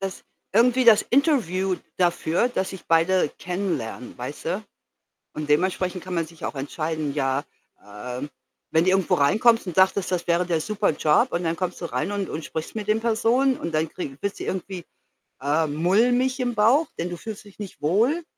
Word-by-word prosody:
Das 195 -1 -5 0.3
irgendwie 250 +3 +4
das 220 -3 +7
Interview 195 - +2 0.2
dafür, 175 +4 +1
dass 190 -6 -2
sich 190 - -9
beide 165 0 +3
kennenlernen, 170 - -4
weißt 125 +4 -7
du? 200 +5 -2 0.7
Und 155 -1 -5
dementsprechend 180 +3 +1
kann 185 - -5
man 165 -1 0
sich 165 0 -15
auch - - -4
entscheiden, 155 +1 -3
ja, 135 -1 0 0.4
ähm, 125 +7 -6 0.4
wenn 160 +2 +3
du - - +4
irgendwo 190 -2 +2
reinkommst 215 +9 +3
und 175 - -5
dachtest, 190 0 +3
das 180 -2 -1
wäre 175 +1 +2
der 170 -2 +1
super 210 +2 0
Job 155 - +2
und 175 - -1
dann 165 0 0
kommst 180 -1 -3
du - - -3
rein 190 - -2
und 200 -2 -2
und 155 - -5
sprichst 160 +5 -6
mit 210 -2 -4
den 215 +1 +2
Personen 235 +4 +2
und 165 - -4
dann 155 0 +1
krieg 140 -7 -6
wirst 200 0 -3
du - - -5
irgendwie, 185 -1 -4 0.6
äh, 150 +4 +2
mulmig 240 - +2
im 245 -1 0
Bauch, 240 +10 +4
denn 170 - -2
du 175 - -4
fühlst 215 +2 -8
dich 200 - -16
nicht 195 -8 -9
wohl 230 - +2
185 Hz, 190 wpm, -24 LUFS, 160-215 Hz, 0.7 s, das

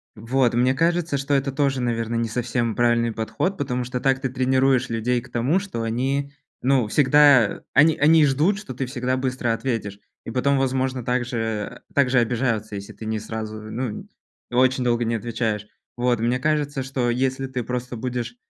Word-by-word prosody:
Вот, 120 +3 +1
мне 125 +2 +3
кажется, 165 0 +1
что 140 +1 -2
это 135 0 +1
тоже, 135 -2 0
наверно, 115 -1 -1
не 115 0 0
совсем 120 -1 -1
правильный 120 -1 +2
подход, 115 - -2
потому 125 -3 -2
что 125 +1 -4
так 135 0 +1
ты 135 - -2
тренируешь 130 0 +2
людей 115 +2 0
к 125 - -15
тому, 130 +11 +1
что 185 -13 -5
они, 135 +5 -1 0.3
ну, 130 -4 +2
всегда 140 -2 +5
они 155 +2 +5
они 155 +2 +5
ждут, 150 +9 +2
что 200 -12 -7
ты 130 +2 -3
всегда 130 0 -2
быстро 130 -2 -1
ответишь. 115 -5 -3 0.3
И 115 - -5
потом, 140 +3 +1
возможно, 130 -2 -1
так 125 0 0
же 120 -1 -4 0.5
э, - - -28
так 140 -3 +3
же 125 -1 +4
обижаются, 115 -3 -1
если 100 0 -7
ты 110 - -10
не 110 0 -2
сразу, 110 0 -6
ну, 110 +1 -5 0.4
очень 130 +1 +3
долго 120 -1 +1
не 115 - 0
отвечаешь. 110 -2 -2 0.3
Вот. 120 -1 +1
Мне 120 +2 0
кажется, 145 -1 0
что 130 -2 -1
если 130 +2 -1
ты 125 -2 -4
просто 125 +1 -4
будешь, 120 0 -4
125 Hz, 185 wpm, -23 LUFS, 115-135 Hz, 0.5 s, всегда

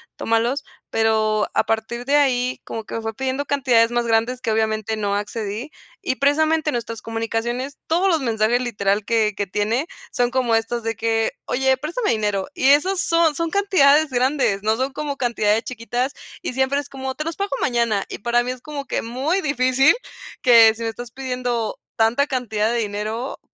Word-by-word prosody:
tómalos". 235 +5 0 0.3
Pero 215 -1 +1
a - - +3
partir 225 +2 -2
de 280 +2 +2
ahí, 255 -3 +1
como 225 - -5
que - - -7
me 225 - -3
fue 225 0 -4
pidiendo 265 +4 -2
cantidades 250 -5 +3
más 240 0 0
grandes 230 +3 +1
que 235 -3 -1
obviamente 220 0 0
no 200 -1 -1
accedí, 210 +5 -4 0.3
y 260 - -1
precisamente 310 +3 +2
nuestras 230 -2 -4
comunicaciones, 230 +4 -3
todos 350 +4 +2
los 330 -3 +2
mensajes 230 0 +1
literal 205 -4 0
que 220 -2 +2
que 205 - -1
tiene 215 +8 0 0.3
son 245 0 0
como 250 -3 +2
estos 225 +1 -1
de 225 0 -2
que: 225 0 0
"Oye, 265 +1 +1
préstame 335 - -2
dinero". 205 -3 -1
Y 265 - +2
esas 360 +7 +4
son 335 -4 +2
son 335 +1 -1
cantidades 315 -7 +4
grandes, 255 -5 +1
no 220 +1 +2
son 260 +4 -1
como 290 0 -4
cantidades 225 -4 +1
chiquitas, 245 +2 -3 0.3
y 340 - -4
siempre 265 +2 +1
es 290 0 -7
como: 265 -1 -5
"Te 305 - -3
los 330 +1 -5
pago 400 0 -2
mañana". 235 -5 +1
Y - - -5
para 240 +3 +1
mí 250 - -2
es 255 -1 -8
como 290 -1 -6
que - - -2
muy 265 +11 -1
difícil 270 +2 +3 0.5
que 230 -3 +7
si 230 - -6
me 225 - -1
estás 235 +1 -8
pidiendo 250 -3 -3 0.2
tanta 230 +6 +2
cantidad 220 -5 -1
de 240 - 0
dinero 215 +4 -3
240 Hz, 185 wpm, -21 LUFS, 225-275 Hz, 0.5 s, que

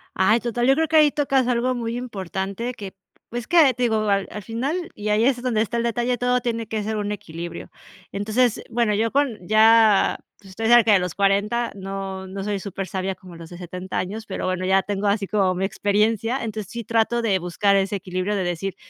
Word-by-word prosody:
Ay, 210 +5 +3
total, 240 +1 -1
yo 270 - +5
creo 320 +1 +1
que 320 - -1
ahí 300 -2 +6
tocas 275 -3 +1
algo 250 +1 +1
muy 235 -1 -3
importante 200 0 -4
que 200 -4 -8 0.4
pues 240 +1 -4
es - - -16
que, 320 -7 +5
te 250 - -8
digo, 225 -2 +2
al 195 -1 +1
al 210 - -7
final 275 - -3
y 210 0 -5
ahí 215 +2 +3
es 250 -2 +1
donde 240 -4 0
está 235 +2 -3
el 235 - 0
detalle, 240 +1 -1
todo 250 0 +2
tiene 230 -2 -3
que 215 -1 -3
ser 220 0 -2
un 205 0 -2
equilibrio. 170 -3 -7 0.4
Entonces, 215 +4 0
bueno, 230 -2 +1
yo 225 +2 +1
con 275 -6 0
ya, 220 -1 +5 0.2
pues, 195 -2 -16
estoy 225 +4 -3
cerca 230 -2 +6
de 195 - +5
los 180 -2 -4
40, 205 +4 +1
no 195 -1 -6
no 195 +1 -6
soy 205 -1 -2
supersabia 190 -1 -4
como 185 -2 -14
los 165 -1 -11
de 175 - -10
70 180 +1 -6
años, 215 +4 -4
pero 190 - -4
bueno, 185 0 -1
ya 190 +1 +3
tengo 205 0 -2
así 200 0 +1
como 190 -2 +1
mi 190 +2 -1
experiencia, 215 +5 0
entonces, 215 -3 -5
sí 235 -1 -5
trato 230 +2 +1
de 195 -4 +2
buscar 180 +3 +1
ese 195 +1 +1
equilibrio 190 +1 -2
de 190 - -1
decir: 175 +2 -3
210 Hz, 220 wpm, -23 LUFS, 195-235 Hz, 0.4 s, ahí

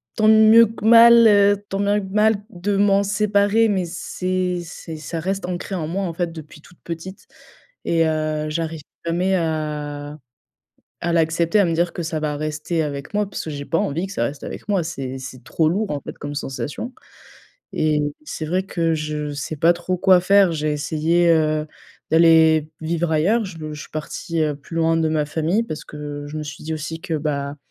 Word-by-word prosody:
tant 215 -1 +2
mieux 220 +1 +7
que 220 -1 -8
mal, 235 0 +8
heu, 205 -1 +4
tant 195 - -3
bien 205 +1 +2
que 190 - -7
mal 215 +1 +4 0.2
de 195 +2 -2
m'en 200 0 +4
séparer, 205 +2 +2
mais 190 -3 0
c'est 180 +1 -2
c'est 165 -1 -9
ça 155 +2 -5
reste 190 +3 -2
ancré 180 +2 -5
en 160 -4 -3
moi 195 +5 -2
en 170 - -3
fait 170 0 -2
depuis 155 -1 -11
toute 175 - -19
petite 170 +3 -7 0.6
et 165 -1 +2
heu, 155 -1 -1
j'arrive 160 -1 -3 0.2
jamais 180 +3 +1
à 150 -3 -3 0.9
à 170 - 0
l'accepter, 170 +4 +2
à - - +4
me 165 - 0
dire 170 +1 0
que 175 - -4
ça 160 -1 -3
va 150 -1 -2
rester 155 +2 -2
avec 140 +2 -5
moi 210 -1 0
puisque 160 - -5
j'ai 145 -1 -5
pas 165 - 0
envie 165 +7 -1
que - - -8
ça - - 0
reste 140 0 -5
avec - - -8
moi. 200 -4 +1
C'est 135 -5 -5
c'est 130 -1 -9
trop 160 +3 +1
lourd 200 +5 -1
en 145 - -3
fait - - -9
comme 145 0 -6
sensation, 145 - -5 0.8
et 155 -1 +1 0.2
c'est 160 - -5
vrai 180 +4 0
que 165 -4 0
je 150 -1 -3
sais 140 +3 -4
pas 165 +4 +4
trop 175 +2 -3
quoi 185 0 +5
faire. 195 0 +4
J'ai 150 -1 -1
essayé, 160 +3 +1
heu, 155 -1 +2 0.4
d'aller 160 -1 +5
vivre 165 +1 -1
ailleurs. 200 +9 +2
Je 185 -4 -8 0.2
je 150 - -8
suis - - -13
partie, 160 +2 -4
heu, 150 -2 0
plus 145 +4 -10
loin 165 0 +2
de 160 -1 +1
ma 155 -1 0
famille. 165 +8 0
Parce 155 -8 -6
que 145 -1 -7
je 150 - -7
me - - -4
suis 150 0 -9
dit 160 - -3
aussi 160 +1 -5
que, 165 - -3
bah, 145 -2 -2
165 Hz, 200 wpm, -21 LUFS, 155-190 Hz, 0.9 s, mal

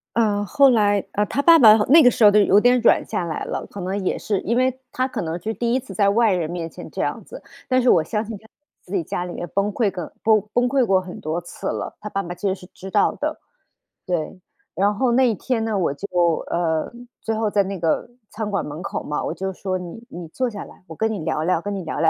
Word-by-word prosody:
呃， 210 -3 +2
后 275 +8 +5
来， 205 -4 +2
呃， 210 - 0
她 265 +8 -1
爸 330 +2 +7
爸 220 -4 +8
好 210 - +1
那 320 +4 +8
个 250 - +7
时 235 - 0
候 205 - +9
都 210 - +5
有 200 -1 +4
点 245 +4 +5
软 235 - +3
下 195 -5 -3
来 160 -2 -4
了， - - -4
可 200 - -8
能 190 +2 -3
也 - - 0
是 205 -3 -1
因 235 - -1
为 260 +1 +1
她 255 - 0
可 240 -4 -4
能 165 0 -3
是 220 +5 -3
第 235 +1 -1
1 260 - +2
次 265 - -11
在 200 -2 +2
外 220 +2 +3
人 175 -4 -1
面 170 -1 -4
前 - - -10
这 - - -4
样 - - -2
子。 - - -11 0.2
但 255 0 +2
是 250 - +3
我 165 - +5
相 210 +7 -2
信 220 -1 -7
她 220 - -19 0.3
自 180 - -12
己 180 - 0
家 175 +3 -4
里 175 - -7
面 175 - -6
崩 200 +1 0
溃 215 -3 +1
个 175 -4 -7
崩 215 -1 +4
崩 245 0 +2
溃 265 -1 +2
过 190 -3 +3
很 180 -1 -9
多 160 +3 -3
次 175 - -8
了， - - -4
她 210 - -7
爸 195 -1 -2
爸 175 - -6
其 190 +3 -3
实 190 - 0
是 185 -1 -14
知 190 - -9
道 - - +3
的。 - - -4 0.6
对， 175 +1 -3 0.4
然 200 +2 +1
后 245 +3 +1
那 255 +1 +4
一 - - +1
天 225 +3 -2
呢， 220 -2 -1
我 175 -7 0
就 195 +8 -7 0.4
呃， 160 -2 0 0.3
最 225 - -2
后 220 -1 0
在 205 - +3
那 195 0 -5
个 165 +7 0 0.2
餐 215 -1 -4
馆 200 - -1
门 150 +3 -7
口 195 - -4
嘛， 150 - -3
我 - - -2
就 190 0 -4
说： 185 0 -3
“你 180 +5 -9
你 175 -1 -8
坐 255 +9 -2
下 210 -3 -7
来， - - -16
我 160 - -9
跟 220 +6 0
你 210 - -3
聊 155 -1 -2
聊， 175 0 +1
跟 205 +2 -4
你 190 - -5
聊 160 - -4
聊。 165 - +5
205 Hz, 290 characters per minute, -22 LUFS, 180-225 Hz, 0.6 s, 候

